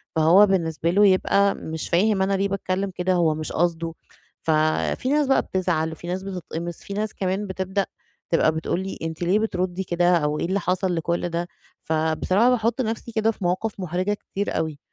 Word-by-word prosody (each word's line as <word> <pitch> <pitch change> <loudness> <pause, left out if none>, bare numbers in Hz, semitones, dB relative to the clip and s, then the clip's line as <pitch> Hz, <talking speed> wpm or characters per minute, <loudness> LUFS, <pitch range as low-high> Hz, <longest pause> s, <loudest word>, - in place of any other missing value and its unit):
فهو 165 +6 +6
بالنسبة 165 -4 0
له 205 +3 +5
يبقى 200 +1 +3
مش 160 0 -5
فاهم 195 +3 +3
أنا 195 +1 +1
ليه 195 +1 +1
باتكلم 195 0 -2
كده، 180 +1 +1
هو 165 -3 +2
مش 155 0 -4
قصده، 165 0 0 0.5
ففي 155 +10 +1
ناس 295 -1 +2
بقى 270 - +4
بتزعل، 170 -4 -1
وفي 160 +2 -9
ناس 185 +2 -3
بتتقمص، 175 -3 -5
في 200 - -7
ناس 210 +1 -2
كمان 195 +2 -2
بتبدأ 190 +1 -2 0.4
تبقى 165 -2 +3
بتقول 160 +2 -2
لي 190 - -5
أنتِ 160 0 -5
ليه 180 +4 +2
بتردي 185 -3 -1
كده، 175 0 +2
أو 150 -1 -1
إيه - - -1
اللي 190 +3 0
حصل 180 0 0
لكُلّ 170 +2 -1
ده؟ 170 +1 -2 0.3
فبصراحة 160 +8 +2
باحط 235 +1 +1
نَفسي 230 0 -3
كده 220 0 +2
في 205 - -10
مواقف 185 +4 -1
محرجة 185 +3 -1
كتير 205 0 -4
أوي. 155 -3 -2
185 Hz, 185 wpm, -24 LUFS, 165-200 Hz, 0.5 s, فهو